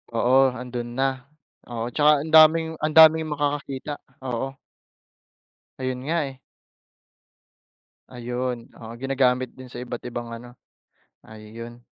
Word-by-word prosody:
Oo, 130 +2 +4
ando'n 125 -1 -5
na, 135 0 -1 0.4
oo, 120 0 -4
tsaka 150 0 +4
ang 160 - -7
daming 160 +1 +7
ang 155 0 -2
daming 160 0 +7
makakakita, 145 -1 -3 0.2
oo. 130 +2 -3 1.2
Ayun 130 -1 -3
nga, 170 - +1
eh. 135 - -10 1.7
Ayun, 125 -1 -5
oo. 115 0 -9
Ginagamit 130 0 0
din 130 0 -12
sa 125 0 -7
iba't 120 -1 -6
ibang 120 -1 -6
ano, 120 +1 -10 0.7
ayun. 115 +2 -11
130 Hz, 115 wpm, -24 LUFS, 120-145 Hz, 1.7 s, daming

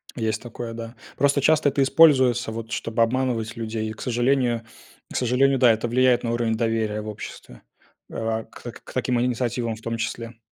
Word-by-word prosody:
Есть 110 -2 -2
такое, 120 -1 -7
да. 115 +1 -8 0.2
Просто 140 +1 +3
часто 155 0 +4
это 140 0 +1
используется, 130 -6 +4
вот, 115 0 -7
чтобы 115 0 0
обманывать 115 -2 -1
людей. 110 -1 -3
И, - - -5
к - - -12
сожалению, 120 -1 +1 0.5
к - - -8
сожалению, 130 +2 +2
да, 120 -2 +6
это 110 +2 -1
влияет 125 0 +3
на 115 - -1
уровень 115 -1 0
доверия 110 -2 -1
в 105 - -8
обществе, 100 - -9 0.5
э, - - -11
а 110 0 -2
к - - -15
так, - - -9
к - - -13
таким 125 -1 0
инициативам 120 -2 -1
в 110 - -14
том 115 0 -3
числе. 115 0 -5
115 Hz, 195 wpm, -24 LUFS, 115-125 Hz, 0.5 s, да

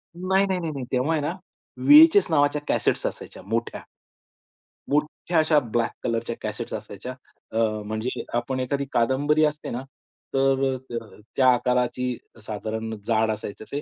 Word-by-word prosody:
नाही, 190 +2 +2
नाही, 190 -2 -1
नाही, 165 -3 -3
नाही. 135 -4 -5
तेव्हा 130 +4 +1
आहे 155 - +1
ना 150 +4 -1 0.5
वी-एच-एस 320 +7 +9
नावाच्या 145 -1 +3
कॅसेट्स - - +1
असायच्या, - - -8
मोठ्या. 115 +3 -2 1.1
मोठ्या 150 +4 0
अशा 155 -1 +4
ब्लॅक 120 -3 -1
कलरच्या 115 0 -1
कॅसेट्स 110 +2 -5
असायच्या. 105 +3 -6 0.4
अ, - - -3 0.3
म्हणजे 110 +4 -3
आपण 130 +2 -2
एखादी 140 +2 -1
कादंबरी 145 +6 +2
असते 150 0 -3
ना, 125 +2 -4 0.5
तर, 135 0 +2
त - - -7 0.4
त्या 130 -1 +4
आकाराची 125 0 0 0.3
साधारण 110 +1 -4
जाड 110 -1 +2
असायचं 105 0 -6
ते 145 - -2
130 Hz, 145 wpm, -25 LUFS, 115-150 Hz, 1.1 s, वी-एच-एस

